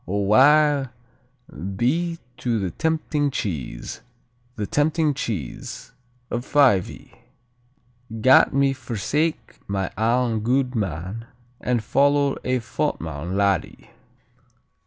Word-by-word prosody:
O 100 +3 -1
wae 140 +6 +5 0.9
be 165 - 0 0.2
to 120 -2 -1
the 95 -4 -2
tempting 155 -2 0
cheese, 70 - -5 0.5
The 105 - -3
tempting 150 +4 +1
cheese 100 - -5 0.4
of 120 - -2
Fyvie, 130 -10 +2 1.1
Gat 130 +4 +6
me 140 0 +2
forsake 145 - -2
my 95 -1 -2
ain 115 0 +1
gude 125 +3 0
man 100 - -4 0.3
And 120 -3 -1
follow 140 +4 +3
a 130 0 +1
fottman 80 -4 -3
laddie. 100 -4 -1
120 Hz, 95 wpm, -23 LUFS, 100-140 Hz, 1.1 s, Gat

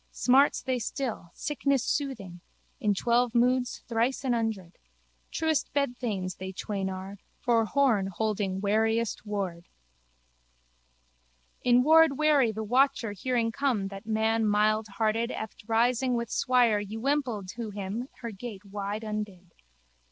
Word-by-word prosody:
Smarts 270 +3 +3
they 255 -1 -1
still, 235 - -4
sickness 280 -3 0
soothing: 225 - -3 0.4
in 205 -1 +1
twelve 240 +3 +1
moons 250 +1 +2
thrice 235 +4 0
an 255 -2 +1
hundred. 220 -7 -3 0.5
Truest 320 -2 0
bedthanes 240 -9 -1
they 190 0 -5
twain 195 0 -3
are, 190 +1 -7 0.2
for 230 -2 +2
Horne 230 -7 +2
holding 195 -1 -2
wariest 220 +2 0
ward. 190 -5 -3 2.0
In 245 0 +5
ward 320 -1 +6
wary 295 -6 +4
the 220 +1 -4
watcher 255 0 +2
hearing 230 +3 -1
come 240 -7 0
that 195 +2 -10
man 220 +1 +1
mildhearted 215 +2 +1
eft 220 -3 -7
rising 245 +2 +2
with 235 -1 -3
swire 245 -5 +3
ywimpled 225 0 -2
to 230 -2 -5
him 205 +5 -5
her 235 -2 -4
gate 205 -1 -8
wide 200 +2 -4
undid. 210 -5 -5
225 Hz, 125 wpm, -28 LUFS, 205-250 Hz, 2.0 s, ward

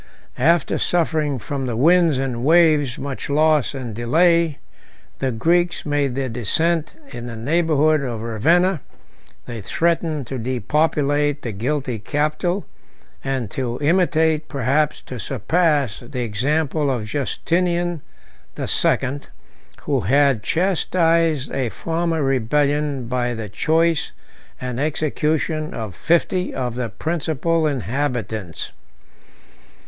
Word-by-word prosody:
After 170 +1 +2
suffering 155 -5 +1
from 135 +2 -4
the 120 - -2
winds 165 +3 +4
and 130 -3 -2
waves 155 -4 +4
much 140 0 -5
loss 150 -1 +2
and 125 -4 -5
delay, 165 +7 +2 0.6
the 135 - 0
Greeks 170 +9 +1
made 145 -3 0
their 135 -1 -1
descent 155 - 0 0.2
in 120 0 -7
the 115 - -6
neighborhood 155 +3 +2
of 120 -5 -4
Ravenna: 160 - +2 0.6
they 120 -3 -6
threatened 165 - 0
to 130 +2 -5
depopulate 145 +4 0
the 115 - -3
guilty 125 +3 -2
capital, 155 - -1 0.6
and 130 -6 -2
to 125 -2 -3
imitate, 160 -1 +2
perhaps 145 +2 0
to 125 - -7
surpass, 140 - 0
the 125 +1 -6
example 145 +6 0
of 120 -5 -1
Justinian 170 +6 -1 0.5
the - - -4
Second, 140 +2 +1 0.5
who 140 -2 +1
had 135 +3 +3
chastised 165 - +1
a 130 -3 -1
former 165 +2 -1
rebellion 140 +1 +1
by 120 0 -1
the 110 -2 -6
choice 160 - +1 0.5
and 125 -1 -4
execution 155 +1 -1
of 110 -4 -5
fifty 170 - 0
of 125 -3 -2
the 120 -1 -3
principal 160 +4 -1
inhabitants. 115 - -3
145 Hz, 115 wpm, -21 LUFS, 125-160 Hz, 0.6 s, winds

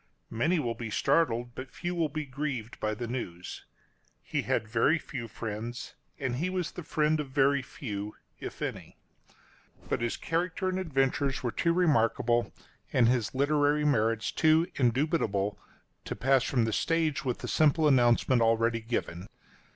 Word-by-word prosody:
Many 155 +11 +1
will 120 -7 -1
be 115 -1 -6
startled, 120 -1 +1
but 130 +1 -7
few 175 +5 -4
will 165 -3 0
be 155 +1 -4
grieved 130 -4 -4
by 110 0 -1
the 120 - -4
news. 90 -8 -6 0.6
He - - -1
had 110 - -1
very 120 +9 +3
few 125 -7 -6
friends, 115 +3 -6 0.2
and 130 -3 -2
he 170 +7 -1
was 185 -3 -2
the - - -7
friend 155 -1 +1
of 145 -3 -4
very 140 +1 +3
few 105 -8 -6
— - - -41
if - - -9
any. - - -5 0.9
But - - 0
his 120 -1 -1
character 175 +3 -1
and 185 0 -1
adventures 135 -5 0
were 120 - 0
too 170 - +1
remarkable, 120 -8 +2 0.4
and 120 -3 +4
his 120 -1 +1
literary 145 +1 +2
merits 115 -5 +1
too 160 +1 +4
indubitable, 120 -6 +1 0.5
to - - -4
pass 135 0 +3
from 125 -4 +1
the 110 - -1
stage 160 -1 +1
with 125 -3 -1
the - - -6
simple 155 0 +3
announcement 125 -2 +4
already 115 0 +2
given. 100 -5 -3
130 Hz, 160 wpm, -29 LUFS, 115-155 Hz, 0.9 s, and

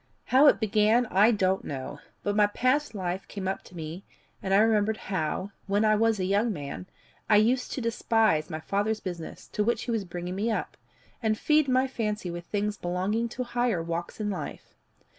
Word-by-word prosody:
How 270 +3 +6
it - - +5
began 220 +3 +3
I 205 +4 +6
don't 190 -4 +1
know, 130 -2 -6 0.2
but 205 0 0
my 210 -1 +5
past 255 +4 0
life 185 -1 -3
came 195 -2 -5
up 190 - -2
to 180 - -14
me, 165 +3 -6 0.4
and 190 - -3
I 195 - +6
remembered 215 0 +3
how, 185 +1 -3 0.2
when 205 +2 +2
I 215 0 +4
was 225 -1 +2
a 185 - 0
young 205 +5 +2
man, 150 +1 -6 0.4
I 215 - +6
used 245 +4 +3
to 265 - -3
despise 225 -8 +1
my 155 - -4
father's 205 +5 0
business, 175 -4 -7
to 210 - 0
which 230 +1 0
he 240 - -3
was 225 -3 0
bringing 175 0 -5
me 205 +5 -1
up, 220 - -2 0.5
and 220 -2 +1
feed 300 +2 +3
my 255 0 +3
fancy 210 -7 -3
with 175 0 -7
things 205 +1 -2
belonging 190 +6 -1
to 250 +2 -4
higher 240 -7 0
walks 170 +4 -4
in 210 -1 -1
life. 185 - -7
210 Hz, 200 wpm, -27 LUFS, 185-225 Hz, 0.5 s, How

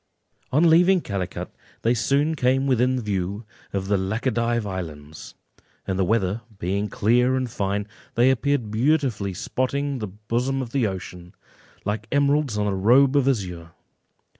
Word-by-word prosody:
On 155 +6 +4
leaving 175 +3 +5
Calicut, 100 - -4 0.3
they 115 - +3
soon 140 +6 +1
came 135 -2 +1
within 130 -1 +2
view 100 0 -3 0.3
of 95 -1 -3
the 100 0 +2
Laccadive 115 +3 0
Islands, 80 -6 -7 0.5
and 95 0 -2
the - - +3
weather 105 +1 0 0.2
being 100 +3 -2
clear 125 +6 +2
and 130 -1 -1
fine, 100 -2 -2 0.3
they 125 +3 +5
appeared 130 -4 0
beautifully 115 - +1
spotting 140 +5 -2
the 105 - -3
bosom 115 +7 -2
of 125 -3 -4
the 130 -4 +1
ocean, 90 -2 -7 0.5
like 105 +1 -2
emeralds 140 -4 +2
on 105 - 0
a 100 - 0
robe 125 +8 +4
of 140 -2 +3
azure. 90 -9 -2
115 Hz, 145 wpm, -24 LUFS, 100-135 Hz, 0.5 s, leaving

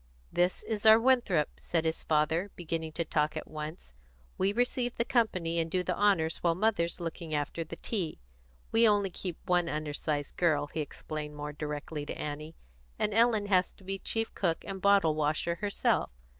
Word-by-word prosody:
"This 180 +1 +1
is 215 -2 -3
our 220 0 +9
Winthrop," 230 - +2
said 165 -1 -1
his 160 0 -1
father, 160 +5 +1
beginning 160 -2 -3
to 170 +1 -1
talk 150 0 0
at - - -5
once. 155 - -7 0.4
"We 195 +1 +2
receive 245 +2 0
the 235 - 0
company 185 -10 +1
and 165 0 -1
do 180 +2 0
the 180 -1 -1
honours 190 -6 +2
while 170 -1 +1
mother's 185 -4 +1
looking 165 -2 -4
after 145 +3 -2
the 165 +1 -8
tea. 180 -4 -3 0.5
We 225 0 +5
only 205 -2 +2
keep 175 -1 -4
one 175 -1 +2
undersized 150 -1 -2
girl," 155 -5 +3
he 145 - -6
explained 150 0 -5
more 150 0 -5
directly 150 0 -4
to - - -5
Annie, 150 +2 -5 0.4
"and 210 - 0
Ellen 225 -2 +4
has 185 -2 +3
to - - -20
be 195 +1 -3
chief 225 +3 -2
cook 170 -4 -1
and 190 -1 -6
bottlewasher 165 -4 +2
herself. 205 -1 +1
170 Hz, 175 wpm, -30 LUFS, 155-200 Hz, 0.5 s, our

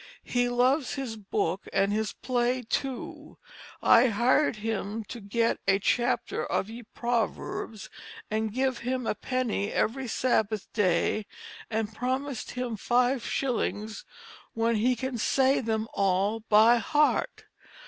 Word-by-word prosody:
He 245 0 +1
loves 255 +3 +2
his 265 -5 -4
book 200 -2 -2
and 195 +1 +2
his 215 0 -1
play 250 0 -1
too. 260 +2 -4 0.5
I 235 +3 +7
hired 240 +5 +2
him 215 0 -3
to 235 +3 -8
get 230 +3 0
a 195 0 +5
Chapter 240 +3 0
of 200 - -2
ye 235 +2 -8
Proverbs 230 -2 -2 0.3
& - - -20 0.2
give 260 +3 0
him 250 +1 -2
a - - +1
penny 235 -4 -2
every 260 +3 0
Sabbath 220 -3 0
day, 200 +1 +1 0.4
& 220 -1 -2
promised 260 +2 -3
him 245 -3 -2
5 245 +3 +2
shillings 220 -4 -2 0.5
when 230 0 +1
he 250 +4 +2
can 255 0 -4
say 265 +4 +3
them 220 -2 -1
all 195 +3 +1
by 220 +3 +7
heart. 295 +7 +1
230 Hz, 130 wpm, -28 LUFS, 215-255 Hz, 0.5 s, I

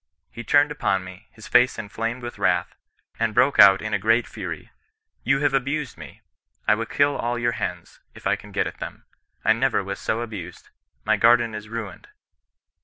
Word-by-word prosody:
He 120 - -8
turned 145 +4 +3
upon 95 -10 0
me, 95 +3 -12
his 110 - -13
face 125 +1 +4
inflamed 115 +3 -4
with 120 - -7
wrath, 90 -1 +1 0.5
and 115 -2 0
broke 140 +2 +3
out 100 0 +8
in 110 0 -4
a 105 - +1
great 115 +4 +2
fury 90 -7 -7 0.2
— - - -52
* - - -47
You 135 +2 +2
have 145 -2 +2
abused 140 +1 -1
me. - - -12 0.5
I - - +6
will 115 +1 -2
kill 145 +3 +2
all 120 +1 -2
your 120 0 0
hens, 115 - -5 0.2
if - - -14
I - - +2
can - - -13
get - - 0
at - - -7
them. - - -8 0.4
I 110 - +6
never 115 -2 +1
was 100 +1 -5
so 115 - -2
abused. 105 -7 -8 0.3
My 110 0 +3
garden 115 +1 +4
is 105 0 -7
ruined.' 110 -5 -7
115 Hz, 200 wpm, -23 LUFS, 105-125 Hz, 0.5 s, out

